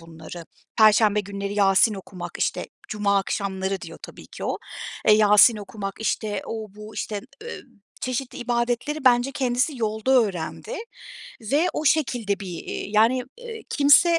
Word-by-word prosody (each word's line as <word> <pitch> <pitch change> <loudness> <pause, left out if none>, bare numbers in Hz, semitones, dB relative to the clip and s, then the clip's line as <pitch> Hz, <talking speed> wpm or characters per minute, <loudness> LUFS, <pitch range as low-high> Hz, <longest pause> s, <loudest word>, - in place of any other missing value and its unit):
bunları. 165 +1 -10 0.3
Perşembe 215 -1 +5
günleri 200 0 -5
Yasin 200 +2 +4
okumak, 180 -2 -8
işte, - - -1 0.2
cuma 200 -1 +1
akşamları 195 -1 -2
diyor - - -9
tabii - - -11
ki - - -8
o, - - -2 0.5
eee, - - +9
Yasin 210 +2 +6
okumak, 200 -1 -6
işte, 210 -2 -1
o 215 -3 -6
bu, 210 +1 -10
işte, 205 -2 -3 0.2
ııı, 470 - -7 0.4
çeşitli 255 +1 -3
ibadetleri 240 +4 -1
bence 250 +2 +4
kendisi 255 +2 0
yolda 220 +2 -1
öğrendi 215 - 0 0.7
ve 285 +11 +1
o 310 - -3
şekilde 240 -9 +1
bir, 180 -4 -6
eee, - - -4
yani, 225 +4 +3 0.2
eee, 455 -2 -8
kimse 330 +4 +5
215 Hz, 145 wpm, -24 LUFS, 200-255 Hz, 0.7 s, eee